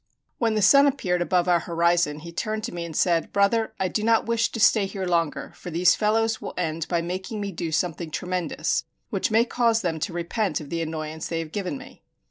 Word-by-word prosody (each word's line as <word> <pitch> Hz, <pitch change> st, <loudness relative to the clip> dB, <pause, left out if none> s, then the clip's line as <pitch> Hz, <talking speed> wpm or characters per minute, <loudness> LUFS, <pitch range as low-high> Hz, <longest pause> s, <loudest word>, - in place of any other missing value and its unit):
When 225 Hz, -2 st, +1 dB
the 215 Hz, -, +1 dB
sun 280 Hz, +5 st, +7 dB
appeared 185 Hz, -11 st, 0 dB
above 175 Hz, 0 st, +1 dB
our 175 Hz, -1 st, +4 dB
horizon 170 Hz, -3 st, +1 dB
he 170 Hz, +1 st, -9 dB
turned 215 Hz, +5 st, -3 dB
to -, -, -3 dB
me 170 Hz, -1 st, -4 dB
and 165 Hz, -2 st, -8 dB
said, 170 Hz, -1 st, +1 dB
"Brother, 205 Hz, +3 st, +2 dB
I 190 Hz, -, +1 dB
do 210 Hz, -, -2 dB
not 225 Hz, +1 st, +3 dB
wish 230 Hz, 0 st, +1 dB
to 225 Hz, -, -5 dB
stay 210 Hz, -2 st, +4 dB
here 195 Hz, -1 st, -4 dB
longer, 170 Hz, -3 st, -1 dB
for -, -, -8 dB
these 175 Hz, +3 st, +4 dB
fellows 220 Hz, +1 st, +1 dB
will -, -, -6 dB
end 165 Hz, -2 st, -2 dB
by 170 Hz, -2 st, 0 dB
making 185 Hz, +5 st, -4 dB
me 200 Hz, -1 st, -3 dB
do 165 Hz, -2 st, -4 dB
something 165 Hz, +1 st, -1 dB
tremendous, 180 Hz, +2 st, -2 dB, 0.3 s
which -, -, 0 dB
may 225 Hz, +2 st, +4 dB
cause 230 Hz, -2 st, +1 dB
them 165 Hz, -3 st, -1 dB
to 155 Hz, -, -2 dB
repent 175 Hz, +1 st, -1 dB
of 150 Hz, -3 st, -10 dB
the 165 Hz, 0 st, -1 dB
annoyance 155 Hz, -1 st, -4 dB
they 165 Hz, -, -3 dB
have 165 Hz, -1 st, -4 dB
given 185 Hz, -7 st, -3 dB
me." -, -, -13 dB
180 Hz, 225 wpm, -25 LUFS, 165-215 Hz, 0.3 s, sun